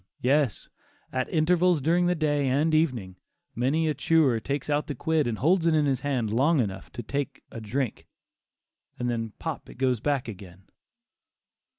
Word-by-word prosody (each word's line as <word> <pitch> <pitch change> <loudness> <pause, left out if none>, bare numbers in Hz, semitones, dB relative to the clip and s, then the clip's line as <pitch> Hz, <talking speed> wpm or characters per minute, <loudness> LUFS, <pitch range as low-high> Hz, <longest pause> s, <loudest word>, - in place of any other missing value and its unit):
yes, 135 -3 +1 0.5
at 130 0 -1
intervals 175 +1 +3
during 170 +5 +2
the 180 - +2
day 145 -3 +1
and 145 +5 +2
evening, 125 - 0 0.4
many 140 +7 +1
a 155 - +1
chewer 150 -8 +3
takes 140 +3 -3
out 150 0 0
the 145 - -4
quid 160 -4 +1
and 115 -2 -2
holds 170 - +2
it 165 - +3
in 150 -1 +3
his 135 -2 0
hand 125 -7 -1
long 145 +6 +3
enough 95 -5 -3
to 120 - -7
take 140 +3 -4
a 115 - -7
drink, 120 +3 -3 0.9
and 125 0 -1
then 115 -2 -3
pop 160 -3 -5
it - - -11
goes 130 -2 +1
back 140 0 -1
again. 95 -3 -10
140 Hz, 175 wpm, -26 LUFS, 120-155 Hz, 0.9 s, intervals